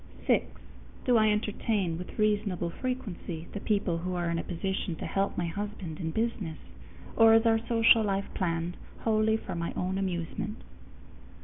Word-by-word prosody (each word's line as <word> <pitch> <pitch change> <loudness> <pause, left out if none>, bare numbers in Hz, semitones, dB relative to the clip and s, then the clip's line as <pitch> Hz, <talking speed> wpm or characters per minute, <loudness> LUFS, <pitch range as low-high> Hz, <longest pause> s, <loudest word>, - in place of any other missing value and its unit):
_6. - - +4 0.6
Do 250 - +4
I 215 -1 +5
entertain 210 -3 0
with 180 - -8
reasonable 205 -5 +1
frequency 190 -9 -4
the 205 - -4
people 200 -5 0
who 180 +1 -3
are 175 -1 0
in 165 - 0
a - - -3
position 190 0 -2
to - - -6
help 195 0 -1
my 175 - 0
husband 180 -2 -5
in 165 -3 -2
business, 205 -5 -2 0.6
or 225 0 +7
is 225 +1 +4
our 225 -1 +5
social 230 -1 +6
life 200 -2 0
planned 170 -1 -1 0.2
wholly 220 0 +3
for 195 - -6
my 170 0 -3
own 185 +1 -1
amusement? 190 +3 -3
195 Hz, 165 wpm, -29 LUFS, 170-215 Hz, 0.6 s, or